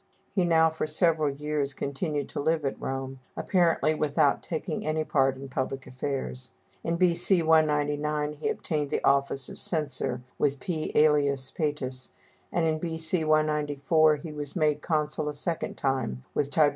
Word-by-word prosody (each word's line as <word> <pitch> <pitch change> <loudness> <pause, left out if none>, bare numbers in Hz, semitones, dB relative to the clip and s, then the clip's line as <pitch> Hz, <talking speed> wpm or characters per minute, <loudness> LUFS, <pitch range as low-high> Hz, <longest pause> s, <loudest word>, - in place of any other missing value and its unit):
He 190 -3 +1
now 160 -1 +4
for 160 -1 -3
several 155 -1 +2
years 145 -1 -2
continued 145 +1 -2
to - - -5
live 160 +1 +1
at 135 - -3
Rome, 135 0 -4 0.2
apparently 165 -4 +2
without 145 -2 +2
taking 160 0 -4
any 155 0 0
part 135 -3 +2
in 135 +1 -8
public 135 +1 -3
affairs. 130 -1 -4 0.3
In 165 - 0
B.C. 175 0 +3
199 150 -1 +2
he 150 - -3
obtained 150 -3 -2
the - - -1
office 140 -1 +2
of - - -9
censor 135 -6 -1 0.2
with 140 -1 +1
P. 155 +1 -3
Ælius 140 -3 +3
Pætus, 135 -4 -2 0.4
and 170 -1 +1
in 155 -1 +1
B.C. 160 0 0
194 155 0 +3
he 150 +2 -8
was 145 -1 -5
made 150 -3 +1
consul 150 -1 -1
a 150 - -5
second 165 +3 -3
time 130 - -1
with 140 - 0
Tib. 150 0 +4
150 Hz, 160 wpm, -27 LUFS, 140-160 Hz, 0.4 s, now